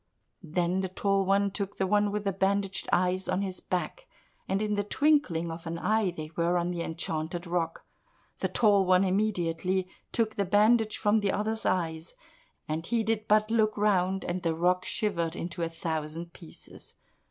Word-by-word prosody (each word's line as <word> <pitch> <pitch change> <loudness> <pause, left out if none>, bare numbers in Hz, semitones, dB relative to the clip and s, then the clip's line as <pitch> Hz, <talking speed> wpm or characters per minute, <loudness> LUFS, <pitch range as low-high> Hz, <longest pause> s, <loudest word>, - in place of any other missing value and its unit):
Then 175 +2 0
the 190 - -2
Tall 195 +1 +1
One 200 +1 +3
took 200 0 -4
the 190 - +1
one 205 +1 +2
with 210 0 -2 0.2
bandaged 195 -1 0
eyes 185 +1 +1
on 185 +2 +1
his 190 -2 -4
back, 460 - -3 0.4
and 195 - +1
in 210 0 0
the 205 0 0
twinkling 205 - +2
of 165 0 -8
an 165 +1 -3
eye 215 +2 +1
they 155 -3 -7
were 170 +1 +2
on 175 0 0
the 175 -1 -3
enchanted 165 +1 -3
rock. 170 -1 -2 0.5
The - - 0
Tall 205 -4 +4
One 185 0 +4
immediately 185 -2 0 0.2
took 220 -2 0
the 200 - +1
bandage 215 +3 +3
from 210 +1 +3
the 200 -2 +1
other's 220 +2 -1
eyes, 160 -3 -1 0.5
and 155 +1 -2
he 235 -2 +1
did 220 0 -1
but 215 +1 +3
look 215 -2 +2
round, 190 -2 +2
and 180 +1 -2
the 165 -2 0
rock 180 +2 +1
shivered 170 -7 -1
into 175 +1 -5
a 165 - 0
thousand 165 +1 -4
pieces. 165 -4 -10
185 Hz, 175 wpm, -29 LUFS, 170-210 Hz, 0.5 s, Tall